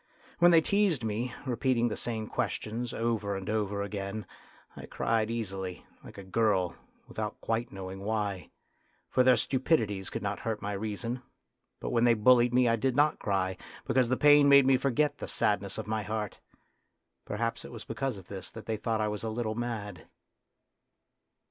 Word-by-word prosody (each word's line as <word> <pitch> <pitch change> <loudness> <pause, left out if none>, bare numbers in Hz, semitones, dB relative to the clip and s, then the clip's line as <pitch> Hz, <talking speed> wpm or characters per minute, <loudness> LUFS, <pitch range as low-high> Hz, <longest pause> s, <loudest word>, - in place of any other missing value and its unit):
When 175 0 +7
they 165 -2 +6
teased 195 - +2
me, 115 +3 -2
repeating 120 -1 +1
the 115 - -2
same 110 -2 -3
questions 115 +2 -3
over 110 -3 -1
and 95 0 -6
over 105 -2 -1
again, 100 +1 -4 0.5
I - - -9
cried 110 -1 0
easily, 95 -5 -4 0.2
like - - -12
a 100 - -7
girl, 95 -2 +1 0.3
without 110 -1 -5
quite 115 +1 -2
knowing 95 0 -7
why, 100 -2 -2 0.6
for - - +4
their 125 -1 +6
stupidities 115 - 0
could - - -5
not 100 0 -2
hurt 110 -2 -3
my 100 - -4
reason; 110 +4 -3 0.6
but - - -4
when 120 -1 +2
they 120 -1 +5
bullied 120 +2 +5
me 125 0 +4
I 115 0 +3
did 130 +2 0
not 150 +2 +3
cry, 95 -2 -1 0.3
because 125 -1 +2
the 130 - +1
pain 145 -1 +6
made 140 -1 +8
me 135 0 +5
forget 140 +3 +1
the - - -5
sadness 100 -2 0
of 110 - -4
my 110 0 -1
heart. 105 0 -4 0.8
Perhaps 115 +8 -3
it - - -10
was 115 -3 -9
because 125 0 -3
of 95 -2 -12
this 95 -2 -7
that 115 - -10
they 110 -1 -2
thought 110 0 -1
I 105 - +1
was 105 -1 -3
a 115 - -3
little 110 0 -2
mad. 110 -5 -5
110 Hz, 180 wpm, -30 LUFS, 100-125 Hz, 0.8 s, made